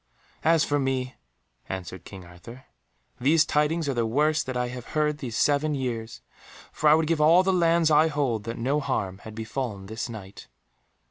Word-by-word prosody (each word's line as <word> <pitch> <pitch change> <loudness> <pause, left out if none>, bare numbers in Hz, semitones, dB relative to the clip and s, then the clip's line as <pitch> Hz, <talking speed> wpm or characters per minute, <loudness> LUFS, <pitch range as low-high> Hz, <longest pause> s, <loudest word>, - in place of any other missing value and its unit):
"As 165 -1 +4
for 145 0 0
me," 130 -1 -1 0.6
answered 95 -1 -6
King 95 -3 -10
Arthur, 100 +9 -13 0.5
"these 150 +5 +4
tidings 150 +2 0
are 140 - 0
the 120 -2 0
worst 150 +6 +1
that 130 -1 -3
I 125 0 -1
have 125 -1 -8
heard 150 -1 +1
these 120 -6 -5
seven 150 +1 +2
years, 120 -4 -4 0.5
for 150 - +2
I 150 - +7
would 160 0 +1
give 160 -1 0
all 165 +4 +6
the 190 0 +1
lands 170 -2 +3
I 155 +2 +5
hold 135 -8 -1
that 115 +1 -5
no 135 +6 0
harm 100 -9 -3
had 110 +1 -11
befallen 110 -2 -4
this 110 +4 -5
Knight." 100 -4 -10
135 Hz, 185 wpm, -26 LUFS, 115-150 Hz, 0.6 s, I